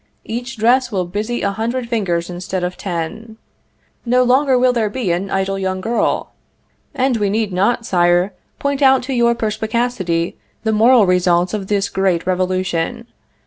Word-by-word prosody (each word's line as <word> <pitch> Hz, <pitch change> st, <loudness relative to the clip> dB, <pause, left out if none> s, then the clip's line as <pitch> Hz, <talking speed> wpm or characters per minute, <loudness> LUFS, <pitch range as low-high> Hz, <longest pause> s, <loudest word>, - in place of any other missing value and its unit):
Each 245 Hz, +3 st, -5 dB
dress 245 Hz, +3 st, +3 dB
will 185 Hz, -3 st, -1 dB
busy 210 Hz, +7 st, -3 dB
a 200 Hz, -, +1 dB
hundred 235 Hz, +4 st, -3 dB
fingers 190 Hz, -8 st, -1 dB
instead 180 Hz, +1 st, -4 dB
of 180 Hz, 0 st, -2 dB
ten. 205 Hz, +5 st, -5 dB, 0.7 s
No 250 Hz, +1 st, +3 dB
longer 260 Hz, +1 st, +3 dB
will 250 Hz, 0 st, +3 dB
there 225 Hz, -3 st, 0 dB
be 210 Hz, -4 st, -2 dB
an 180 Hz, +3 st, -2 dB
idle 195 Hz, 0 st, -1 dB
young 190 Hz, -1 st, -2 dB
girl, 230 Hz, +5 st, -1 dB, 0.6 s
and 260 Hz, -2 st, +1 dB
we 205 Hz, -2 st, 0 dB
need 210 Hz, -1 st, -1 dB
not, 215 Hz, +6 st, +1 dB
Sire, 175 Hz, +1 st, +2 dB, 0.2 s
point 280 Hz, 0 st, -2 dB
out 265 Hz, -1 st, +5 dB
to 265 Hz, +2 st, -4 dB
your 235 Hz, -1 st, +3 dB
perspicacity 220 Hz, -6 st, -1 dB, 0.3 s
the 220 Hz, -1 st, +1 dB
moral 225 Hz, +1 st, +5 dB
results 180 Hz, 0 st, +2 dB
of 200 Hz, -3 st, -3 dB
this 200 Hz, -1 st, 0 dB
great 190 Hz, -4 st, 0 dB
revolution. 185 Hz, +1 st, -1 dB
210 Hz, 160 wpm, -18 LUFS, 185-240 Hz, 0.7 s, out